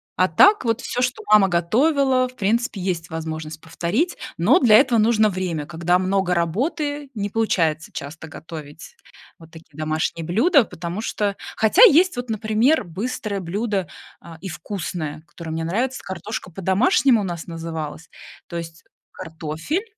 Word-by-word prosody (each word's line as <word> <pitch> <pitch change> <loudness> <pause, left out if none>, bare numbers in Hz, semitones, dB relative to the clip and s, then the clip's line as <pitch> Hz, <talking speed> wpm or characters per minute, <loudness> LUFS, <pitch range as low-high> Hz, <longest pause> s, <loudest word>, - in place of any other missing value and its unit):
А 185 - +3
так 385 - +5
вот 230 +2 0
всё, 245 - -3
что 250 0 -1
мама 210 -2 +7
готовила, 255 - +2
в 250 - -15
принципе, 220 -1 -1
есть 175 -3 -3
возможность 160 -1 -6
повторить, 185 - -2 0.2
но 190 +11 +4
для 230 -5 +6
этого 235 -2 +4
нужно 215 -1 +4
время, 180 -5 -3
когда 170 +2 +1
много 185 -1 0
работы. 285 - -1
Не 205 -1 -2
получается 165 -8 0
часто 160 +3 -7
готовить 155 -1 -10 0.4
вот 165 -1 -15
такие 160 -3 -16
домашние 155 +1 -2
блюда, 235 - +4
потому 175 +2 -6
что 205 -3 -2 0.2
Хотя 225 - +5
есть 365 - +6
вот, 245 -1 -5
например, 220 +7 +2
быстрое 200 +3 -4
блюдо, 195 +1 -2 0.3
а, 165 -1 -12
и 190 - -6
вкусное, 160 -3 -5
которое 160 +1 -9
мне 160 0 -3
нравится, 245 +10 -1
картошка 190 0 -6
по-домашнему 205 +6 +3
у - - -3
нас 175 -2 -5
называлась, 160 -2 -6 0.4
то 170 - -6
есть 165 -1 -8 0.3
картофель, 165 - -4
185 Hz, 150 wpm, -22 LUFS, 165-235 Hz, 0.4 s, мама